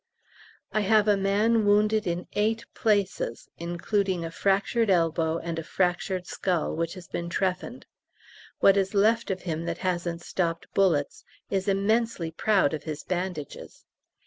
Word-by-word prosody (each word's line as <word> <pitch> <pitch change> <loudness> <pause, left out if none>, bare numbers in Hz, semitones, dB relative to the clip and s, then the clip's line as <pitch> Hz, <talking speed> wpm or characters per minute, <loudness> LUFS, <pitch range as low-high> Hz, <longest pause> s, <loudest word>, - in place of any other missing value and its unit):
I 215 - +1
have 215 +1 +3
a 205 - +5
man 210 +3 +2
wounded 210 +1 +3
in 175 +1 -2
eight 225 +2 0
places, 200 - 0
including 175 +1 -1
a 165 - -5
fractured 200 +5 +1
elbow 165 -2 +2
and 170 -1 -4
a - - -5
fractured 180 +1 -1
skull, 180 -5 -1
which 165 +2 -2
has 180 -2 -11
been 170 0 -4
trephined. 185 +7 -2 0.8
What 195 0 +6
is 195 +1 0
left 220 +3 +3
of 190 -1 -3
him 165 -1 -3
that 170 0 -3
hasn't 175 -2 -1
stopped 170 -2 -2
bullets 165 -8 +1 0.3
is 195 -1 -1
immensely 200 -3 +1
proud 190 -3 +2
of 155 - -3
his 155 -2 -5
bandages! 180 -5 -5
185 Hz, 145 wpm, -27 LUFS, 170-205 Hz, 0.8 s, What